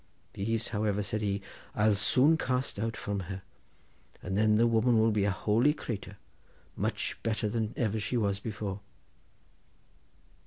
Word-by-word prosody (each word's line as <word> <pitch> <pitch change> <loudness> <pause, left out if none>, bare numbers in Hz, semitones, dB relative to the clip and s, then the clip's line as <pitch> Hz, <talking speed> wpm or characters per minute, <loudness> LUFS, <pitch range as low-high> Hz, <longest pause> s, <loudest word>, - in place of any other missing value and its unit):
'These, 115 +3 -1
however,' 105 -2 0
said 105 +1 -2
he, 100 -1 -1 0.3
'I'll 105 0 +4
soon 130 +10 +4
cast 130 -7 -1
out 115 +1 -2
from 100 -1 -2
her, 95 -1 -5 0.8
and 95 +1 -3
then 105 +1 +4
the 115 - +5
woman 115 +1 +3
will 110 0 +4
be 105 -2 +2
a - - +3
holy 115 +9 +2
cratur, 100 -7 -6 0.6
much - - -2
better 110 -1 -1
than 110 0 -2 0.2
she 105 +4 -1
ever - - +2
was 100 -2 0
before. 105 -2 -4
105 Hz, 150 wpm, -30 LUFS, 100-115 Hz, 0.8 s, the